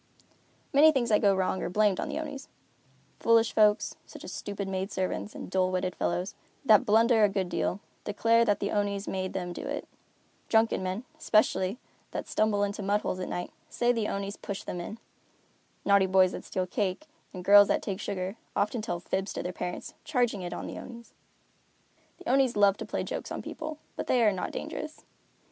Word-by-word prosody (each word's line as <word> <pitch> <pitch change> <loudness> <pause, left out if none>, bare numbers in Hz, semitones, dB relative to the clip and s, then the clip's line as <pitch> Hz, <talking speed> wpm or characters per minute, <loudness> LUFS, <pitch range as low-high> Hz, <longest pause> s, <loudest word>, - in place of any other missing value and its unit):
Many 300 +3 +8
things 255 -5 0
that 210 - +4
go 200 -2 +4
wrong 190 0 0
are - - -2
blamed 205 0 +2
on - - -2
the - - -3
Onis. 290 -3 -6 0.7
Foolish 230 0 +4
folks, 210 -1 +3
such - - -11
as - - -7
stupid 200 -1 -5
maid 190 +1 -3
servants, 190 +3 -3
and - - -6
dull 185 0 +1
witted 185 0 -1
fellows, 180 +3 -1 0.3
that 215 -5 +6
blunder 225 +1 +5
a 205 - +6
good 195 -2 -1
deal, 190 +3 -1 0.2
declare 230 +3 +3
that 205 -3 +2
the 200 - -2
Onis 205 -1 -1
made 185 -1 -3
them 180 -2 -3
do - - -6
it. - - -4 0.6
Drunken 225 -3 +3
men, 185 +5 -3 0.2
especially, 215 -1 +2 0.4
that - - -4
stumble 210 -1 +1
into 205 +1 -2
mud 205 +1 +1
holes 185 - -3
at 185 - -4
night, 175 - -4 0.2
say 240 0 +2
the 225 -3 0
Onis 200 +1 -3
pushed 200 -1 -6
them 175 - -4
in. 210 +6 -7 0.9
Naughty 200 -1 +5
boys 185 -1 +5
that - - -7
steal 185 - -2
cake, 190 +7 -2 0.3
and 180 -2 -8
girls 205 +1 +8
that - - +1
take 195 -1 -3
sugar, 195 0 -3 0.2
often 210 +3 0
tell 215 -6 -3
fibs 190 +2 -2
to - - -4
their 180 - -4
parents, 180 0 -5
charging 245 -9 0
it 175 -1 -5
on - - -5
the - - -6
Onis. 235 -2 -11 1.0
The - - -12
Onis 265 -1 +3
love 200 -1 +5
to - - -6
play - - -2
jokes - - -5
on - - -4
people, 310 -1 -6 0.2
but - - -4
they 245 -2 +3
are 215 - +5
not 185 - -3
dangerous. 310 0 -6
205 Hz, 200 wpm, -29 LUFS, 185-225 Hz, 1.0 s, Many